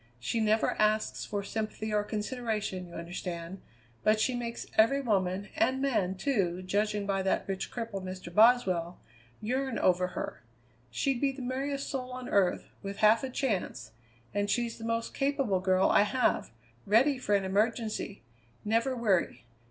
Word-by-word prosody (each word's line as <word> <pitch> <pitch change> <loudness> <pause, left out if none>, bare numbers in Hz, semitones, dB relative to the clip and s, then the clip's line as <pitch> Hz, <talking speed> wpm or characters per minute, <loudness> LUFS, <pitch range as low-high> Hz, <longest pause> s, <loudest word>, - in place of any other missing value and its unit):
She 175 - -1
never 220 0 +2
asks 215 0 +1
for 205 -1 -3
sympathy 215 +1 -3
or 210 0 +2
consideration, 215 -4 -3
you 170 - -12
understand, 170 +1 -6 0.4
but 215 0 +3
she 255 - +2
makes 235 -1 -4
every 230 +6 +5
woman, 200 -5 0
and 265 -5 +2
man, 220 -9 +1
too, 185 -6 0
judging 205 +2 0
by 195 -1 0
that 190 - 0
rich 195 -1 -3
cripple, 225 -5 -4
Mr. 185 -2 -7
Boswell, 190 -6 +4 0.4
yearn 260 +2 -1
over 180 0 +3
her. - - -4 0.5
She'd 245 - -1
be 280 -1 +3
the 265 -1 -8
merriest 275 +2 -2
soul 255 -2 -4
on 255 0 -6
earth, 195 -3 +2 0.2
with 200 0 -6
half 215 +3 +5
a 265 - -2
chance, 240 - -2 0.4
and 205 0 0
she's 235 +1 -1
the 225 - -6
most 230 0 -1
capable 275 -8 +1
girl 185 0 +3
I - - +6
have: 210 +5 +1 0.4
ready 250 +7 +4
for 210 -5 +1
an 195 -1 +1
emergency; 215 +1 -1 0.4
never 230 +5 +1
weary. 200 - 0
215 Hz, 160 wpm, -30 LUFS, 190-245 Hz, 0.5 s, I